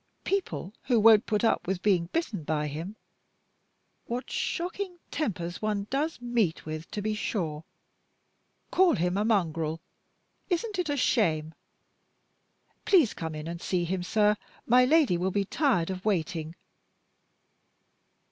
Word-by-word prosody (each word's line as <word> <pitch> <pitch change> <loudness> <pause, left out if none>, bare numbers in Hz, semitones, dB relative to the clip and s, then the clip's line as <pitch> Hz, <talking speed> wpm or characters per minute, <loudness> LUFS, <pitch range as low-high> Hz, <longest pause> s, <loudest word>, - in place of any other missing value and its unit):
People 375 - -2
who 245 -3 +3
won't 220 +1 +6
put 210 0 0
up 225 - +2
with 190 0 -2
being 180 -5 +3
bitten 210 - -2
by 150 0 -1
him 160 +8 -5 1.1
(what 245 +2 -4
shocking 360 +1 -3
tempers 180 - -3
one 210 -2 -1
does 295 +3 -1
meet 235 -8 0
with, 155 +1 -6
to 205 - -4
be 215 0 0
sure!) 165 -8 -3 1.1
call 370 -2 +4
him 180 +2 0
a 205 - +1
mongrel. 165 -7 0 0.7
Isn't 385 +3 -1
it 350 -4 -1
a 290 - 0
shame? 160 - +1 1.3
Please 345 - +4
come 160 -2 -5
in 155 +1 -6
and 170 +1 -6
see 180 -2 0
him, 185 +2 -2
sir; 210 +3 +2 0.3
my 250 +2 +5
Lady 285 - +4
will 185 +2 +1
be 200 +1 0
tired 200 - +1
of 185 0 -6
waiting." 165 -5 -1
205 Hz, 140 wpm, -28 LUFS, 170-250 Hz, 1.3 s, won't